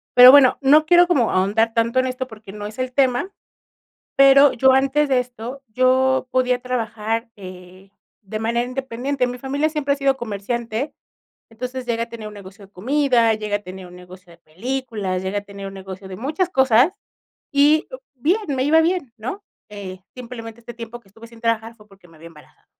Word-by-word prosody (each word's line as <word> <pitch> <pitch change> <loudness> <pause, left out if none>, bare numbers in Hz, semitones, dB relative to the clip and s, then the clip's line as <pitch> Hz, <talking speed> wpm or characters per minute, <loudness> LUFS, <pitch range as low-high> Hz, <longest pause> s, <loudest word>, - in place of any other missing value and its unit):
Pero 250 +1 +11
bueno, 275 -3 +6
no 300 +3 +5
quiero 350 +2 +5
como 270 -10 +2
ahondar 215 +5 +1
tanto 230 +2 +1
en 255 - +1
esto 255 0 -4
porque 215 -4 -12
no 205 -1 -7
es 220 +4 -11
el 255 0 -3
tema. 270 +7 +1 0.9
Pero 275 +1 +7
yo 265 +2 +4
antes 275 +2 +2
de 260 -1 +3
esto, 250 +2 -7
yo 255 +2 +2
podía 250 -1 +1
trabajar, 230 -2 -3
eh, 185 0 -13 0.3
de 215 +2 -6
manera 235 +2 -1
independiente. 255 +1 -3
Mi 250 0 -6
familia 280 +4 -1
siempre 290 -2 -1
ha - - -5
sido 275 -1 +1
comerciante, 230 +3 -4 0.6
entonces 250 +2 -6
llegué 230 -1 -1
a 235 - -5
tener 225 -2 -8
un 210 - -12
negocio 200 0 -13
de 195 - -33
comida, 240 +1 +2
llegué 210 -1 -2
a 205 - -9
tener 185 0 -10
un 180 - -14
negocio 180 0 -15
de 170 - -19
películas, 205 +1 -4
llegué 190 +2 -2
a - - -3
tener 200 -1 -9
un 195 - -8
negocio 190 0 -9
de 185 - -8
muchas 310 - -2
cosas 265 +1 +3 0.6
y 295 +2 +3
o - - -9
bien, 340 - 0
me 265 -2 -1
iba 320 +2 +5
bien, 330 -8 -1
¿no? 255 - -6 0.3
Eh, 190 -3 -8
simplemente 235 -2 -9
este 235 0 -10
tiempo 235 0 -9
que 200 - -26
estuve 225 +4 -14
sin 230 -1 -17
trabajar 230 0 -1
fue 210 -2 -21
porque 195 -2 -20
me 165 -2 -20
había 165 - -13
embarazado. 150 -2 -20
235 Hz, 195 wpm, -21 LUFS, 210-265 Hz, 0.9 s, Pero